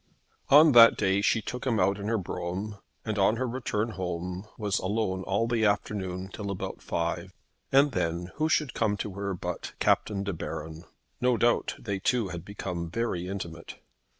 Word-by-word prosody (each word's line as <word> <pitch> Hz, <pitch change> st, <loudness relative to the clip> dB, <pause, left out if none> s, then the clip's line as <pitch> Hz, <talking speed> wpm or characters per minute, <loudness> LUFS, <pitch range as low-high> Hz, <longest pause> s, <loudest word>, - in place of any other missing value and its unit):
On 150 Hz, +2 st, +8 dB
that 115 Hz, -2 st, +8 dB
day 95 Hz, -1 st, +2 dB
she 110 Hz, +1 st, +2 dB
took 125 Hz, +3 st, -5 dB
him 115 Hz, -4 st, +2 dB
out 100 Hz, +1 st, +2 dB
in 100 Hz, -, -4 dB
her 115 Hz, +1 st, +1 dB
brougham, 95 Hz, +2 st, -4 dB, 0.3 s
and 110 Hz, -2 st, -2 dB
on 100 Hz, +3 st, +4 dB
her 130 Hz, +2 st, -1 dB
return 115 Hz, -3 st, -2 dB
home 90 Hz, 0 st, -4 dB
was 105 Hz, -2 st, 0 dB
alone 95 Hz, -1 st, -1 dB
all 100 Hz, +4 st, +1 dB
the 115 Hz, -1 st, +1 dB
afternoon 95 Hz, -3 st, -1 dB
till 100 Hz, -2 st, -5 dB
about 100 Hz, -, -5 dB
five; 85 Hz, +2 st, -2 dB, 0.4 s
and 140 Hz, +2 st, +5 dB
then 85 Hz, -3 st, -2 dB
who 155 Hz, +1 st, +1 dB
should 150 Hz, -4 st, +1 dB
come 105 Hz, -3 st, +1 dB
to 105 Hz, -1 st, -4 dB
her 100 Hz, 0 st, -3 dB
but 90 Hz, 0 st, -5 dB
Captain 100 Hz, -2 st, +1 dB
De 100 Hz, 0 st, -2 dB
Baron. 80 Hz, +1 st, -6 dB, 0.4 s
No 125 Hz, -1 st, +3 dB
doubt 120 Hz, +2 st, +2 dB
they 100 Hz, -4 st, -4 dB
two 115 Hz, 0 st, +1 dB
had 85 Hz, -2 st, -6 dB
become 90 Hz, -4 st, -5 dB
very 90 Hz, -3 st, -2 dB
intimate. 85 Hz, -4 st, -6 dB
100 Hz, 180 wpm, -28 LUFS, 90-115 Hz, 0.4 s, On